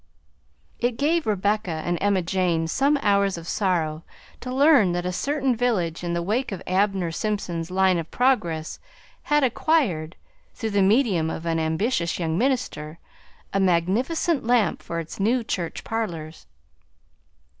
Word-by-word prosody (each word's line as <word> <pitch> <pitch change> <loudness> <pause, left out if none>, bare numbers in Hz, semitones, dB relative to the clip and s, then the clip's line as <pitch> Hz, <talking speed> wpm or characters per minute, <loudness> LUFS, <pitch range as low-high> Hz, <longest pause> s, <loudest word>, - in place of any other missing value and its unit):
It 240 -1 0
gave 315 +1 +1
Rebecca 205 0 0 0.2
and 175 0 -1
Emma 200 -2 +2
Jane 170 -2 0
some 280 - +2
hours 200 -2 +2
of 170 0 -9
sorrow 165 -6 -1 0.4
to 250 - -6
learn 265 - +5
that 175 0 -2
a 180 - -1
certain 275 +3 0
village 190 -9 -1
in 170 -1 -2
the 170 - -1
wake 225 +7 -1
of 190 -1 -6
Abner 190 -2 +1
Simpson's 175 -4 -3
line 185 -1 +2
of 165 - -6
progress 175 -12 0 0.4
had 295 -1 +2
acquired, 230 - +1 0.4
through 220 -1 -3
the 200 -1 +2
medium 195 - +3
of 160 - -5
an 165 -1 0
ambitious 170 +3 0
young 160 -2 -1
minister, 175 - -1 0.6
a 195 - +1
magnificent 215 - +1
lamp 235 -2 +2
for 170 - -4
its 165 +3 -8
new 230 +5 +2
church 175 -6 -4
parlors. 165 - -5
195 Hz, 145 wpm, -24 LUFS, 170-240 Hz, 0.6 s, learn